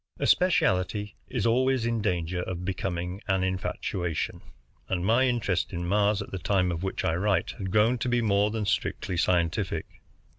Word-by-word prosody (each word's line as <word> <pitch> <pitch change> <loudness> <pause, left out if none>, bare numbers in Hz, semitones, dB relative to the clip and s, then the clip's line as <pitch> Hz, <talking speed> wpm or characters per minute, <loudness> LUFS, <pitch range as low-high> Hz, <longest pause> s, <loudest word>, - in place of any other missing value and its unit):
A - - 0
specialty 105 - +2
is 125 -4 -2
always 130 +1 +2
in 115 -1 0
danger 90 -3 -1
of 90 0 -5
becoming 90 0 -3
an 95 -2 +1
infatuation, 90 -2 -2 0.5
and 90 -1 -1
my 120 +5 +4
interest 105 -9 0
in 85 0 -3
Mars, 105 +2 +2
at - - -13
the 95 - -4
time 90 0 +1
of 85 -1 -3
which 95 0 -2
I 80 - +2
write, 95 +3 +1
had 95 -2 -3
grown 110 +5 +3
to 125 - -1
be 120 0 +2
more 105 -2 +2
than 110 -1 -2
strictly 95 - -1
scientific. 85 +2 +1
95 Hz, 175 wpm, -27 LUFS, 90-110 Hz, 0.5 s, my